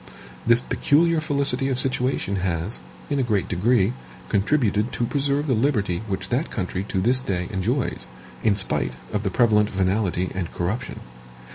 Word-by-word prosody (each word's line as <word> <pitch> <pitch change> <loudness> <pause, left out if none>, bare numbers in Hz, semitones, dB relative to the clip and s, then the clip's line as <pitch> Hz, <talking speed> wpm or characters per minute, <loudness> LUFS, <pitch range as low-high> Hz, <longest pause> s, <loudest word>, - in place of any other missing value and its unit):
This 120 +1 +6
peculiar 165 +6 +2
felicity 140 -3 0
of 130 - 0
situation 125 -6 0
has, 90 +2 -2 0.3
in 140 - +1
a - - +3
great 110 -6 0
degree, 105 +3 +2 0.4
contributed 105 0 +1
to 120 - 0
preserve 140 +2 0
the 135 - +1
liberty 110 -8 +1
which 95 -2 -3
that 130 +7 0
country 95 -2 -3
to 95 - -1
this 125 +7 +3
day 90 -7 -2
enjoys, 110 - -1 0.3
in 110 -3 +3
spite 65 -10 +1 0.2
of 105 - 0
the 100 - -1
prevalent 105 0 +3
venality 95 -1 0
and 95 -3 -3
corruption. 90 +7 -3
110 Hz, 155 wpm, -24 LUFS, 95-130 Hz, 0.4 s, This